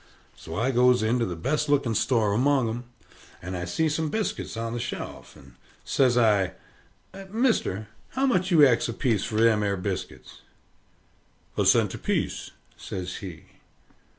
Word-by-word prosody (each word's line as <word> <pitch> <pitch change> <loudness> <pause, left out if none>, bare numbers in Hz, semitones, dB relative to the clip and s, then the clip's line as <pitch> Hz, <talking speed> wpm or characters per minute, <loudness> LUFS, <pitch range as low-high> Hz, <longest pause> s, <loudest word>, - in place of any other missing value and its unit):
So 80 - -9
I 125 +5 +1
goes 125 -1 +4
into 115 +2 +1
the 90 - -4
best 150 - -1
looking 140 -5 +2
store 110 -2 +2
among 130 +2 +2
'em. 120 +2 -4 0.5
And 90 +2 -6
I 90 0 -3
see 160 - 0
some 155 +1 -1
biscuit 215 - -3
on 115 0 -3
the 120 - -3
shelf, 120 - -6
and - - -16 0.3
says 125 -3 +2
I, 105 -5 +3 0.8
"Mister, 215 - 0 0.3
how 265 +1 +1
much 190 -8 +1
do 175 - +2
you 150 -3 +8
ax 120 -3 +2
apiece 115 -3 0
for 110 - -4
them 110 -1 +4
'ere 100 -1 0
biscuits?" 90 - -6 1.1
"A - - +1
cent - - +4
apiece," - - -2 0.3
says 90 -1 -6
he. 85 -4 -9
115 Hz, 155 wpm, -26 LUFS, 105-145 Hz, 1.1 s, you